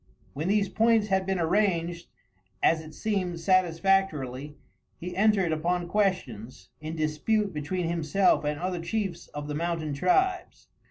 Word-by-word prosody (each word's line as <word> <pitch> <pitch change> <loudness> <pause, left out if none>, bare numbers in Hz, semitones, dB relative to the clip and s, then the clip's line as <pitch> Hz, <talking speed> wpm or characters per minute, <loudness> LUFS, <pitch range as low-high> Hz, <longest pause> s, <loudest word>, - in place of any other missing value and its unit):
When 155 +5 -3
these 200 0 +2
points 220 +1 +2
had 190 -1 +1
been 190 -1 0
arranged, 170 -1 0 0.6
as 160 -1 +4
it 155 -1 -12
seemed, 185 -5 -2
satisfactorily, 165 -6 +1 0.4
he 180 +1 -6
entered 200 -3 +3
upon 175 +3 -1
questions 130 - -2
in 155 +1 -6
dispute 165 +7 0
between 165 +4 -2
himself 170 +3 +2
and 150 0 -2
other 180 0 -2
chiefs 195 +2 -3
of 145 0 -7
the 150 - -4
mountain 165 -1 -2
tribes. 365 - 0
175 Hz, 140 wpm, -27 LUFS, 155-195 Hz, 0.6 s, as